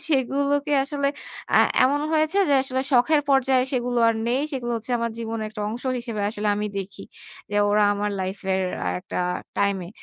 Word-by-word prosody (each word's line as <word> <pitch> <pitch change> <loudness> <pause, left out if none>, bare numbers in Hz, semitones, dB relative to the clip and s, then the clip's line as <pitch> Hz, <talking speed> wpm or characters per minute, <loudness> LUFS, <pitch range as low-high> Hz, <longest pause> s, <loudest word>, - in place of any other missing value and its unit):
সেগুলোকে 285 +1 +1
আসলে 280 0 -1 0.5
আ - - +6 0.3
এমন 285 +3 +2
হয়েছে 315 +5 +2
যে 285 - +4
আসলে 260 -1 -2
শখের 290 +5 +4
পর্যায়ে 265 -1 +3
সেগুলো 245 -1 0
আর 230 - +2
নেই। 250 +3 +1
সেগুলো 240 -3 -3
হচ্ছে 225 +3 -5
আমার 235 0 -1
জীবনের 225 -1 -3
একটা 215 0 -8
অংশ 235 +3 -6 0.2
হিসেবে 230 -3 -5
আসলে 210 -1 -2
আমি 210 - -1
দেখি 195 +1 -7 0.5
যে 205 - -4
ওরা 210 +1 +3
আমার 205 +1 -2
লাইফ 190 +2 -3
এর 190 - +1 0.4
একটা - - -5 0.4
টাইম 200 -1 +2
এ। - - -10
245 Hz, 180 wpm, -24 LUFS, 210-275 Hz, 0.5 s, আ